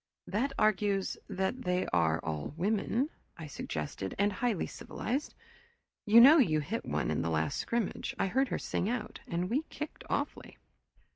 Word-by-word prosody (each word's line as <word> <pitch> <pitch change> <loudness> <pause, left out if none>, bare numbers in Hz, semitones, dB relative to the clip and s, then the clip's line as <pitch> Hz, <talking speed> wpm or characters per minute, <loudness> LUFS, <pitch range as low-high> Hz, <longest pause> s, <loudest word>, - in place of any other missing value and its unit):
"That 240 +8 -1
argues 205 -2 +2
that 190 +6 -1
they 180 -2 0
are 80 -2 +3
all 80 - -4
women," 220 - 0 0.3
I 165 - -7
suggested, 95 - -5
"and 205 +1 +2
highly 225 -2 0
civilized. 270 +6 -4 0.7
You 220 +3 +8
know 285 +7 +9
you 155 - +4
hit 205 +11 -3
one - - -1
in - - 0
the 85 - -1
last 80 -1 0
scrimmage 235 -4 -2
I - - +1
heard 265 +8 +2
her - - -2
sing 195 - -2
out 225 -3 -3
and 175 +2 -1
we 255 +9 +1
kicked 300 0 -7
awfully." - - -3
200 Hz, 160 wpm, -31 LUFS, 160-235 Hz, 0.7 s, know